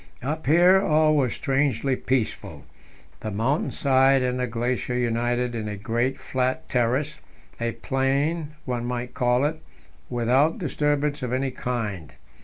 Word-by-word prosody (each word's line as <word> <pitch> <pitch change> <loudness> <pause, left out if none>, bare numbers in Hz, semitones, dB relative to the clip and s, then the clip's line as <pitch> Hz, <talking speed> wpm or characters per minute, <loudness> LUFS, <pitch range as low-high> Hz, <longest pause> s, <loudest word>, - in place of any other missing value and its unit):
Up 155 +2 -3
here 175 +5 +6
all 155 -3 +3
was 130 -5 +2
strangely 135 -2 0
peaceful; 130 -3 -2 0.5
the 110 - -4
mountain 115 +9 0
side 135 -1 +3
and 125 0 -1
the 125 - 0
glacier 120 +2 -2
united 120 0 0
in 110 -2 -3
a 105 0 -4
great 120 +6 -1
flat 130 0 -2
terrace 130 +5 0 0.4
a 115 0 -1
plain, 145 +4 -1
one 120 -2 -2
might 125 0 -4
call 125 +2 +2
it 155 +1 -2 0.5
without 125 +6 +2
disturbance 150 -2 0
of 125 -2 -3
any 130 +1 0
kind. 110 -11 -4
130 Hz, 140 wpm, -25 LUFS, 120-145 Hz, 0.5 s, here